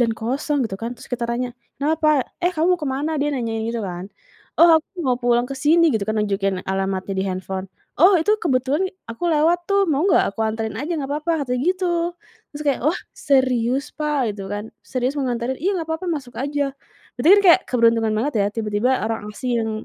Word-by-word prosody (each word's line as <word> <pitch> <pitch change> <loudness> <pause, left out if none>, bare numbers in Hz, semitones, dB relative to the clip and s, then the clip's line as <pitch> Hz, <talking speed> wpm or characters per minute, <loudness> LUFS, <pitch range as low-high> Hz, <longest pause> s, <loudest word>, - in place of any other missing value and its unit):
dan 230 -2 +3
kosong 265 +4 -1
gitu 195 -3 -4
kan," 235 +2 -4
terus - - -13
kita 240 -1 -1
tanya, 245 +1 -2 0.2
"Kenapa?" 305 -1 +2 0.2
"Eh 355 - +3
kamu 335 +3 +3
mau - - -21
kemana?" 295 +2 -2
Dia 295 - +1
nanya 235 -4 -2
gitu 230 0 -2
kan, 180 +1 -6 0.5
"oh 335 -1 +8
aku 350 +3 -9
mau 250 -1 +2
pulang 240 0 +2
ke - - -5
sini" 320 +4 +4
gitu 210 -3 0
kan 215 - 0
nunjukin 195 -2 0
alamatnya 190 0 -2
di 190 - 0
handphone, 190 +1 -4 0.3
"oh 370 +3 +7
itu 420 +6 +2
kebetulan 280 +5 +1 0.2
aku 285 +10 -3
lewat 335 +3 +2
tuh 395 0 +3
mau 300 +3 +1
nggak 200 - +3
aku 225 - -7
anterin 220 -1 -2
aja 320 +5 -2
nggak 280 -2 -4
apa-apa," 305 0 -1
katanya 250 0 -1
gitu, 370 -1 -2 0.7
terus 300 - -5
kayak 280 - +1
"wah, 340 - -1 0.2
serius 260 -1 +1
Pak?" 290 -7 0
Gitu 195 -1 -6
kan, 210 +2 -5
"serius 255 +1 -1
mau 280 - -1
nganterin?" 245 +2 -2
"Iya 380 +4 +1
nggak 320 - -6
apa-apa 360 +3 -4
masuk 260 -5 -6
aja," 285 0 -1 0.4
berarti 245 +6 +1
kan - - -4
kayak 370 - +4
keberuntungan 230 -2 +3
banget 250 +5 -1
ya 200 - +2
tiba-tiba 225 +3 0
orang 220 -2 -3
asing 250 +3 -3
yang 220 0 -2
255 Hz, 205 wpm, -21 LUFS, 225-305 Hz, 0.7 s, oh